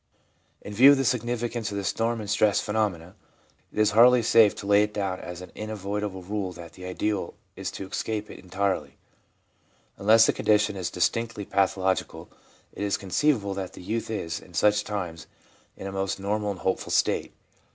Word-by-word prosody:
In 105 - -7
view 130 +7 +8
of - - +1
the 135 - 0
significance 120 -1 -1
of 100 - -4
the 100 - -3
storm 115 +4 -1
and 105 - -7
stress 105 0 +3
phenomena, 100 -5 -2 0.6
it - - -15
is 105 -1 +4
hardly 120 +3 +6
safe 110 -2 +5
to - - -8
lay 100 0 +5
it 105 0 -1
down 95 -3 -2
as 90 0 -8
an 90 - -10
in 110 0 -6
violable 100 -2 -4
rule 100 -2 -2
that 85 -1 -11
the 90 +1 -10
ideal 100 +3 -2 0.2
is - - -4
to 95 - -7
escape 105 +1 -3
it - - -11
entirely. 95 +1 -2 1.0
Unless 110 +2 +6
the - - +2
condition 105 -1 +2
is 95 -2 -3
distinctly 115 +3 -1
pathological, 95 -1 0 0.4
it - - -8
is 100 -1 0
conceivable 100 - 0
that 95 -1 -5
the - - -11
youth 110 +4 -3
is, 85 -7 -3
in 90 - -16
such 105 +3 +3
times, 90 -6 -5 0.5
in - - -8
a 95 - -4
most 95 0 -2
normal 105 +1 -1
and 100 -3 -5
hopeful 95 - -1
state. - - +1
105 Hz, 185 wpm, -26 LUFS, 95-110 Hz, 1.0 s, view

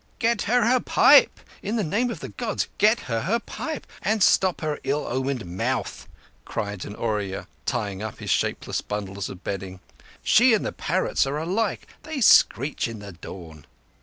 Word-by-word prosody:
"Get 230 -1 +1
her 245 -1 +4
her 250 +2 +4
pipe. - - +5 0.2
In 210 +3 -3
the 220 - +1
name 210 +9 0
of 235 - -6
the - - -6
Gods, 230 -4 -3
get 215 +3 +4
her 115 -2 -2
her 220 +7 +1
pipe 310 +5 -6 0.2
and 215 -1 +1
stop 190 -2 +3
her 155 -2 -2
ill 145 +2 -1
omened 130 -2 -2
mouth," 90 +2 -3 0.4
cried 100 -2 -4
an 100 - -8
Oorya, 105 -4 -2 0.2
tying 105 -5 -2
up 110 -2 -5
his - - -4
shapeless - - -1
bundles 100 -2 -4
of 90 - -10
bedding. 95 -1 -5 0.4
"She 235 +2 +5
and 210 - -2
the - - -2
parrots 175 -4 0
are 140 +2 -2
alike. 190 +7 -1 0.2
They 310 -3 -5
screech 145 - +4
in 115 -1 -7
the 100 -1 -9
dawn." 80 -3 -11
140 Hz, 175 wpm, -24 LUFS, -, 0.4 s, pipe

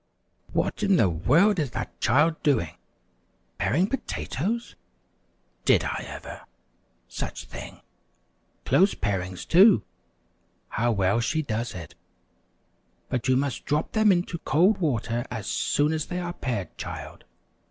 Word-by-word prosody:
"What - - -1
in 200 -2 +4
the 110 - +4
world 165 - +3
is 145 -4 0
that - - -6
child 150 +7 +3
doing? 115 - +1 0.8
Paring 140 - +2
potatoes? 235 - -3 0.9
Did - - +4
I - - -3
ever! - - -8 0.7
Such - - -5
thin, - - -9 0.8
close 195 +2 +4
parings, 90 -3 -3
too! 195 +4 +6 0.9
How 120 +2 +1
well 100 0 +2
she 155 +7 0
does 115 -3 -3
it! 85 - -8 1.2
But 125 -1 -2
you 130 0 +4
must 140 -1 -2
drop 150 +3 0
them 215 -2 +4
into 175 -2 0
cold 190 +8 +3
water 120 - -1
as 110 -5 -5
soon 145 +7 +1
as 155 -1 -2
they 180 - -4
are 175 -1 -4
pared, 110 - -4
child. - - -7
145 Hz, 130 wpm, -26 LUFS, 115-180 Hz, 1.2 s, too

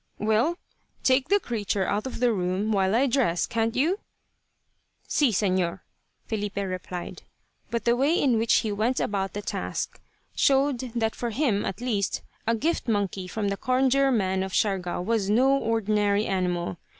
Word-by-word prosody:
"Well, 220 +11 +1 0.5
take 260 0 +3
the 405 +1 +4
creature 205 - -2
out 210 +7 -1
of 260 - -6
the 245 -1 +3
room 185 +2 -1
while 195 0 +2
I 255 +4 +4
dress, 240 -10 +1
can't 225 0 -1
you?" 335 +10 +1 1.1
"Si, 290 -4 +3
Señor," 185 -4 0 0.4
Filipe 210 -2 -3
replied; 185 -2 -4 0.5
but 230 -3 -2
the 235 0 +4
way 285 +7 +2
in 245 -5 +3
which 225 +1 +1
he 220 - -2
went 220 +5 0
about 195 -2 -1
the 205 - -5
task - - -4 0.3
showed 275 -1 +3 0.2
that 225 -1 0
for 240 - -3
him, 230 -4 0
at 195 - -5
least, 215 -6 -1 0.2
a 230 - +3
gift 315 +7 -1
monkey 200 -4 -1
from 205 +1 -2
the 200 - -2
Conjure 265 +3 +2
man 190 -5 +1
of 190 0 -3
Siargao 185 -4 0
was 215 -1 0
no 260 +6 +4
ordinary 210 -4 +1
animal. 180 -2 -1
220 Hz, 160 wpm, -26 LUFS, 195-250 Hz, 1.1 s, the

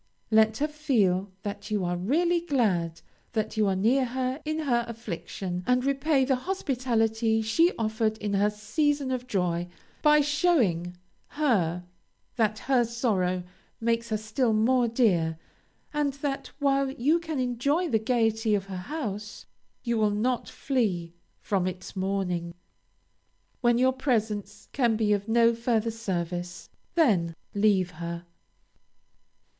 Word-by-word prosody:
Let 220 0 +4
her 300 - +1
feel 220 -11 +1
that 205 0 -5
you 205 -3 0
are 175 0 -1
really 335 - +1
glad 190 - 0 0.3
that 220 -1 -1
you 215 -1 +2
are 190 - +1
near 235 +8 +3
her 255 +3 -2
in 310 +1 -1
her 240 -5 +1
affliction, 185 -4 -5
and 250 +1 +2
repay 275 0 +2
the 265 0 +2
hospitality 235 - 0
she 330 +11 +3
offered 220 -1 0
in 210 -2 -3
her 200 +1 +3
season 270 +7 0
of 250 -1 -3
joy 175 -6 0 0.3
by 300 0 +6
showing 250 - +1 0.3
her 185 - 0 0.5
that 215 -3 +1
her 255 +1 +2
sorrow 205 -7 0 0.4
makes 230 0 0
her 215 - 0
still 220 +2 0
more 240 +3 +3
dear, 180 -9 +2 0.6
and 295 -2 0
that, 275 0 -3
while 275 -1 +2
you 275 +6 +2
can 320 -3 -4
enjoy 260 +7 0
the 225 -8 +2
gayety 225 -1 +1
of 195 -1 -2
her 190 -1 -6
house, 210 - -5 0.4
you 235 -2 0
will 215 -1 +3
not 235 +5 -1
flee 190 -11 -1 0.3
from 190 -3 0
its 185 +1 -6
mourning. 185 -3 -2 1.0
When 240 -1 +3
your 260 +1 +3
presence 220 -6 -2
can 240 -5 +2
be 215 -1 +2
of 205 0 -2
no 230 +1 +4
further 230 -1 0
service, 180 -5 -4 0.2
then 190 - +3 0.2
leave 200 -3 +2
her. 170 +1 -6
225 Hz, 140 wpm, -27 LUFS, 195-260 Hz, 1.0 s, by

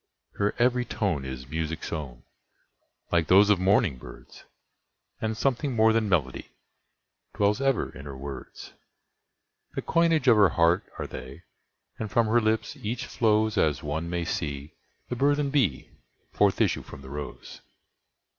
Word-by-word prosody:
Her 100 0 0
every 125 +1 +2
tone 95 - -2
is 65 -1 -7
music's 80 +3 -4
own, 70 -7 -6 0.9
like 85 -2 +2
those 100 +3 +6
of 100 - +3
morning 95 - +2
birds, - - -13 0.8
And 110 0 -2
something 135 +1 0
more 110 0 +5
than 110 -2 +1
melody 75 -9 -1 0.8
dwells 105 +4 +1
ever 135 -2 0
in 70 +3 -10
her 70 -2 -7
words; 70 -1 -9 1.0
The - - -3
coinage 165 -4 +2
of 115 -3 +7
her 100 -3 +6
heart 85 +4 +2
are - - -4
they, 65 +7 -9 0.6
and 110 - -3
from 115 +3 +2
her 115 +2 +3
lips 110 0 0
each 115 +3 -4
flowsAs 110 - +1
one 80 +3 -3
may 85 -1 -2
see 70 -3 -4 0.3
the 125 - -3
burthened 145 +2 +1
bee 125 - 0 0.4
forth - - +2
issue - - +2
from 70 - -12
the 65 - -10
rose. 75 -1 -8
100 Hz, 145 wpm, -27 LUFS, 75-115 Hz, 1.0 s, of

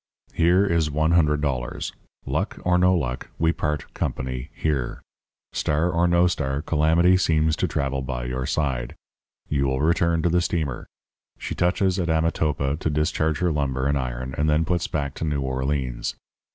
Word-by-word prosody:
Here 90 +4 +4
is 85 -5 +1
one 80 +2 +1
hundred 75 -4 +3
dollars. 65 -5 -2 0.3
Luck - - -2
or 90 0 +3
no 90 +1 +4
luck, 65 -7 -2
we 80 0 +2
part 75 -4 -3
company 65 0 -3
here. 70 -6 -2 0.5
Star 80 +4 +1
or 85 +1 +2
no 85 0 +4
star, 70 -5 -1
calamity 85 +4 +4
seems 80 -3 +2
to - - +1
travel 70 -1 -1
by 60 -2 -4
your 65 +1 -3
side. 65 -6 -1 0.5
You 70 -2 +1
will 65 0 0
return 85 +1 +2
to 85 - +3
the 90 +1 +3
steamer. 80 -7 -2 0.5
She - - -5
touches 90 +2 +1
at 85 -2 -1
Amotapa 75 -3 +1
to 80 - -1
discharge 75 +1 0
her 90 -1 +2
lumber 65 -3 -1
and 70 +1 +2
iron, 65 -1 -3
and 75 +1 +2
then 75 +2 +2
puts 85 0 0
back 70 -3 -2
to - - -4
New 75 -3 -1
Orleans. 65 -2 -2
75 Hz, 170 wpm, -24 LUFS, 65-85 Hz, 0.5 s, Here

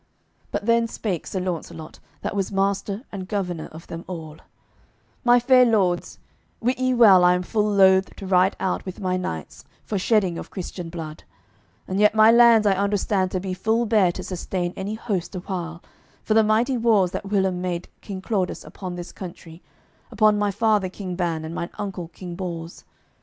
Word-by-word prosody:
But - - -3
then 230 0 +3
spake 195 -7 -4
Sir 190 - -3
Launcelot, 170 -3 -5 0.2
that - - -3
was 195 -1 -1
master 195 +2 -1
and 190 -2 -6
governor 180 -6 -3
of 160 +2 -12
them 165 0 -7
all: 160 -4 -7 0.9
"My 245 0 +6
fair 255 +1 +5
lords, 195 -7 +1 0.4
wit 250 +2 0
ye 255 0 +1
well 200 -7 +7
I 180 0 +5
am 180 - -2
full 210 +2 0
loath 190 -1 +4
to 195 - -8
ride 185 +1 +3
out 190 - -1
with 185 -1 -7
my 185 -2 -1
knights, 80 - -5 0.2
for 205 - -2
shedding 190 -4 +1
of - - -8
Christian 180 -2 -6
blood; 160 -2 -7 0.6
and 190 +1 -2
yet 210 +1 +4
my 220 +1 +7
lands 235 -2 +6
I 200 - +4
understand 200 -1 0
to 185 - -2
be 185 0 -4
full 220 +5 0
bare 210 -5 +3
to - - -6
sustain 180 -1 -3
any 200 +3 -4
host 200 -6 -3
a - - -2
while, 175 -3 -5 0.4
for 215 - +1
the 220 0 +5
mighty 230 +5 +2
wars 215 -6 +3
that 195 - -5
whilom 190 -3 +1
made 180 -1 -3
King 190 -2 -7
Claudas 190 -5 -1
upon 185 -2 -7
this 175 0 -7
country, 170 -2 -10 0.5
upon 215 -1 +3
my 205 0 +1
father 205 -1 +1
King 185 -1 -6
Ban 165 -3 -2
and 160 - -6
on - - -7
mine 170 - -4
uncle 190 -4 -5
King 175 +1 -9
Bors. 170 -2 -6
190 Hz, 190 wpm, -23 LUFS, 180-210 Hz, 0.9 s, well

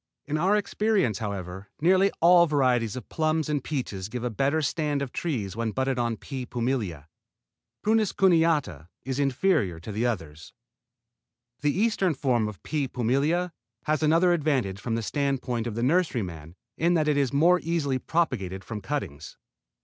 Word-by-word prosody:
In 150 - -3
our 185 +7 +3
experience, 205 - +1
however, 95 -2 -5
nearly 185 +5 +4
all 175 0 +7
varieties 125 -7 +1
of 125 - -7
plums 155 -1 0
and 145 -3 -1
peaches 105 -10 -4
give 125 +1 -5
a 125 - -1
better 140 +7 +1
stand 150 -1 0
of 130 - -6
trees 110 - -3
when 115 0 -1
budded 130 +2 -1
on 115 -2 -1
P. 130 -3 -6
pumila. 115 - -2 0.8
Prunus 220 -1 +2
cuneata 160 - +2 0.2
is 135 +1 -3
inferior 135 - +1
to 85 - -8
the 110 +4 0
others. 80 -9 -5 1.1
The 150 - +1
eastern 200 -6 +2
form, 120 -6 +1
P. 145 -3 -1
pumila, 140 +9 0 0.3
has 155 0 0
another 165 +3 +4
advantage 135 - 0
from 115 -1 -2
the 115 - -2
standpoint 130 -3 -1
of 110 - -4
the 115 - -2
nurseryman 105 - -1 0.2
in 170 +2 +3
that 155 -2 +1
it 150 - +3
is 140 -4 +1
more 170 +6 +4
easily 155 -6 -1
propagated 95 - -1
from 110 0 -6
cuttings. 100 - -5
135 Hz, 155 wpm, -26 LUFS, 110-160 Hz, 1.1 s, all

